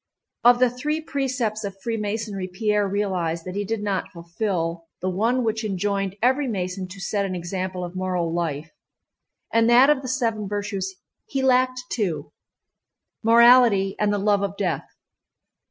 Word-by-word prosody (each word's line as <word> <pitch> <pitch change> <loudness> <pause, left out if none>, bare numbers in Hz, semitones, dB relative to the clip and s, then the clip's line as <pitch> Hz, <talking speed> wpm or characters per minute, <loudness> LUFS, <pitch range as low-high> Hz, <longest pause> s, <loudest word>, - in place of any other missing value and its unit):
Of 245 0 +7
the 250 -1 +3
three 295 +5 -2
precepts 255 -8 -2
of 195 -1 -6
Freemasonry 210 -3 -3
Pierre 210 +2 0
realized 185 -5 -1
that 185 - -5
he 205 +1 -2
did 215 +1 -3
not 200 -2 -2
fulfill 170 -1 -3
the 185 - -1
one 230 +7 +1
which 220 0 -1
enjoined 195 -1 -1
every 260 +3 +3
Mason 185 -3 -3
to 190 +2 -11
set 200 +1 -1
an 190 -2 -3
example 185 +1 -4
of 175 +1 -7
moral 180 -3 -1
life, 165 -2 -3 0.8
and 230 0 +4
that 250 +4 +7
of 280 -3 +1
the 260 - -6
seven 230 -5 -1
virtues 200 -2 -3 0.3
he 270 -1 -2
lacked 255 -1 +3
two—morality 225 - +2
and 210 -1 +2
the 205 - +1
love 205 0 +2
of 200 0 -3
death. 185 -5 -1
205 Hz, 155 wpm, -24 LUFS, 185-235 Hz, 0.8 s, Of